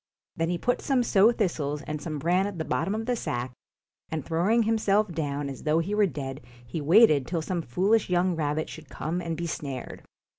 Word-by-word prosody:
Then 165 Hz, 0 st, -1 dB
he 175 Hz, -, 0 dB
put 245 Hz, +7 st, 0 dB
some 265 Hz, -3 st, +2 dB
sow 215 Hz, 0 st, +5 dB
thistles 155 Hz, -10 st, -1 dB
and 150 Hz, -1 st, -5 dB
some 155 Hz, -1 st, -4 dB
bran 175 Hz, +6 st, +2 dB
at 200 Hz, -3 st, -6 dB
the 160 Hz, -, -3 dB
bottom 195 Hz, -, -1 dB
of 225 Hz, +1 st, -3 dB
the 250 Hz, 0 st, 0 dB
sack, 125 Hz, -, -3 dB, 0.6 s
and 155 Hz, -4 st, -4 dB
throwing" 190 Hz, +8 st, +2 dB
himself 215 Hz, -2 st, +2 dB
down 145 Hz, -3 st, -2 dB
as 135 Hz, -2 st, -7 dB
though 155 Hz, +1 st, +2 dB
he 170 Hz, +5 st, -1 dB
were 210 Hz, -1 st, +4 dB
dead, 135 Hz, -5 st, -6 dB, 0.2 s
he 120 Hz, +7 st, -4 dB
waited 155 Hz, -, +5 dB
till 165 Hz, -2 st, -2 dB
some 175 Hz, +1 st, -2 dB
foolish 190 Hz, -, +1 dB
young 180 Hz, 0 st, +2 dB
rabbit 155 Hz, 0 st, -1 dB
should 160 Hz, -3 st, -10 dB
come 170 Hz, +4 st, -3 dB
and 165 Hz, -2 st, -3 dB
be 170 Hz, -, -3 dB
snared. 140 Hz, -5 st, -5 dB
170 Hz, 210 wpm, -27 LUFS, 150-200 Hz, 0.6 s, sow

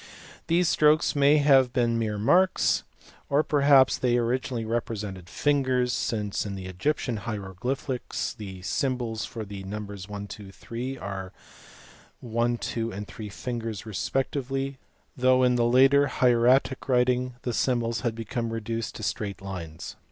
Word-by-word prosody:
These 170 Hz, +1 st, +3 dB
strokes 155 Hz, +1 st, +3 dB
may 145 Hz, +1 st, +5 dB
have 135 Hz, -4 st, +5 dB
been 120 Hz, -2 st, +1 dB
mere 110 Hz, -2 st, -1 dB
marks; 180 Hz, -, +3 dB, 0.5 s
or 145 Hz, +2 st, +3 dB
perhaps 140 Hz, -3 st, +4 dB
they 120 Hz, -1 st, +2 dB
originally 120 Hz, 0 st, -1 dB
represented 105 Hz, -5 st, -4 dB
fingers, 130 Hz, -4 st, +1 dB
since 105 Hz, -3 st, -1 dB
in 100 Hz, -2 st, -5 dB
the 95 Hz, -1 st, -7 dB
Egyptian 115 Hz, +6 st, -1 dB
hieroglyphics 115 Hz, +6 st, -3 dB
the 95 Hz, -5 st, -9 dB
symbols 120 Hz, -1 st, -1 dB
for 110 Hz, -2 st, -6 dB
the 100 Hz, -1 st, -8 dB
numbers 100 Hz, -1 st, -7 dB
1, 100 Hz, 0 st, -5 dB
2, 100 Hz, -1 st, -9 dB
3, 125 Hz, +6 st, -6 dB
are 95 Hz, -3 st, -6 dB, 0.9 s
one, 120 Hz, 0 st, 0 dB
two, 115 Hz, 0 st, -3 dB
and 105 Hz, 0 st, -6 dB
three 105 Hz, -2 st, -8 dB
fingers 115 Hz, -1 st, -5 dB
respectively 135 Hz, +4 st, -2 dB, 0.4 s
though 130 Hz, 0 st, +4 dB
in 125 Hz, 0 st, +4 dB
the 120 Hz, -1 st, +2 dB
later 135 Hz, +4 st, +5 dB
hieratic 125 Hz, +2 st, +3 dB
writing 125 Hz, 0 st, +2 dB
these 120 Hz, -2 st, -2 dB
symbols 120 Hz, -2 st, 0 dB
had 120 Hz, -3 st, -1 dB
become 115 Hz, +1 st, -3 dB
reduced 115 Hz, 0 st, -4 dB
to 110 Hz, -, -7 dB
straight 105 Hz, -1 st, -3 dB
lines. 90 Hz, -5 st, -7 dB
120 Hz, 140 wpm, -26 LUFS, 105-130 Hz, 0.9 s, may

